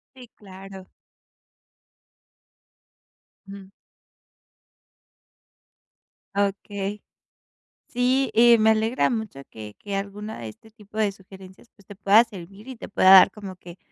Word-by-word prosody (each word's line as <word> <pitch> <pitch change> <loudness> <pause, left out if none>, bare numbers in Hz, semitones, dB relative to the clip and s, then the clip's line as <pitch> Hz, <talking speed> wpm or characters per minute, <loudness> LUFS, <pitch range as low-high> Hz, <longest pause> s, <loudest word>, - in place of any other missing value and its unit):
Sí, 255 -2 -14
claro. 190 -1 -13 2.6
Ujú. 195 -1 -11 2.7
Okey. 200 0 -3 0.9
Sí, 255 +2 0
y 235 +1 +6
me 220 0 +4
alegra 220 +3 +1
mucho 220 - -5
que 105 -1 -11
que 200 -1 -7
alguna 205 +2 -6
de 115 - -7
este 220 - -16
tipo 215 -1 -13
de 210 -2 +1
sugerencias, 190 +2 -16
pues, 200 -3 -23
te 205 - -12
pueda 205 +3 +4
servir 200 0 -13
y 265 - -8
te - - -10
pueda 190 -2 +3
dar 190 -1 +8
como 200 -3 -10
que 175 0 -14
200 Hz, 115 wpm, -23 LUFS, 190-220 Hz, 2.7 s, dar